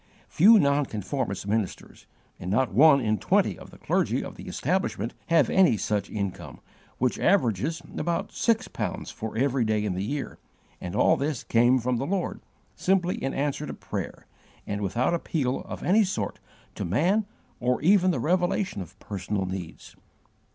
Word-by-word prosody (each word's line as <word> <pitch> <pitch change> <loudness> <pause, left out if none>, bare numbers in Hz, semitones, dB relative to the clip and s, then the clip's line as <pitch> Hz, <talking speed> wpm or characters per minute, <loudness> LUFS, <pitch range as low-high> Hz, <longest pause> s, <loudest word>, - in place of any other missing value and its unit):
Few 215 +7 +7
nonconformist 135 - 0
ministers, 105 -2 -3 0.3
and 90 - -5
not 115 +3 +1
one 140 +5 +7
in 110 -3 0
twenty - - +2
of - - -12
the - - -15
clergy - - 0
of - - -7
the - - -10
establishment, 170 -7 -1
have 160 -6 +4
any 180 - +4
such 105 -1 -1
income, 100 -3 -5 0.4
which 125 0 0
averages 155 - +1 0.2
about 170 -1 -2
six 230 -1 +1
pounds - - -4
for 110 0 -6
every 135 0 +2
day 110 -1 0
in 100 - -1
the 90 - -3
year 140 +6 -4 0.4
and 90 -1 -5
all - - +4
this 140 -2 -2
came 120 +3 +4
from 125 0 0
the 135 +4 -2
Lord, 190 0 -2 0.3
simply 185 -1 0
in 135 - -2
answer 145 +1 -1
to - - -6
prayer, - - -6 0.4
and 100 0 -3
without 115 - 0
appeal 145 -6 -1
of - - -7
any 210 +5 +4
sort 190 - -3 0.3
to - - -5
man 185 - +1 0.3
or 125 +1 +1
even 185 +1 +5
the 175 - 0
revelation 180 - 0
of 85 - -10
personal 100 0 -3
needs. 90 -3 -7
130 Hz, 165 wpm, -26 LUFS, 105-170 Hz, 0.4 s, Few